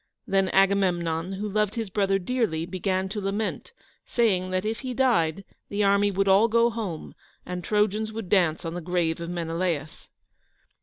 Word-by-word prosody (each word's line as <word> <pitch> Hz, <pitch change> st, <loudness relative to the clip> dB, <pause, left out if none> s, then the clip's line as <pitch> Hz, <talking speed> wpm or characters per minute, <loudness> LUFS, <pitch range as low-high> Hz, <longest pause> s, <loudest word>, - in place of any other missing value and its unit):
Then 195 Hz, -1 st, +1 dB
Agamemnon, 185 Hz, -3 st, +1 dB
who 205 Hz, +2 st, -3 dB
loved 210 Hz, +1 st, 0 dB
his 225 Hz, -4 st, -3 dB
brother 195 Hz, 0 st, +2 dB
dearly, 195 Hz, -5 st, -1 dB
began 185 Hz, +1 st, -1 dB
to 210 Hz, +1 st, -4 dB
lament, 200 Hz, -, -3 dB, 0.3 s
saying 190 Hz, -6 st, +1 dB
that 185 Hz, +2 st, -1 dB
if 220 Hz, +1 st, -2 dB
he 255 Hz, -2 st, -5 dB
died, 195 Hz, -10 st, +2 dB, 0.3 s
the 205 Hz, +1 st, 0 dB
army 200 Hz, +1 st, +4 dB
would 195 Hz, 0 st, 0 dB
all 195 Hz, +4 st, +5 dB
go 235 Hz, +1 st, +3 dB
home 205 Hz, -8 st, -5 dB, 0.3 s
and 180 Hz, 0 st, -5 dB
Trojans 210 Hz, +1 st, +1 dB
would 220 Hz, -3 st, -6 dB
dance 175 Hz, -3 st, +2 dB
on 165 Hz, -, -3 dB
the 175 Hz, -, -4 dB
grave 170 Hz, -1 st, -1 dB
of 170 Hz, -, -5 dB
Menelaus. 165 Hz, -2 st, -3 dB
195 Hz, 165 wpm, -26 LUFS, 175-210 Hz, 0.3 s, all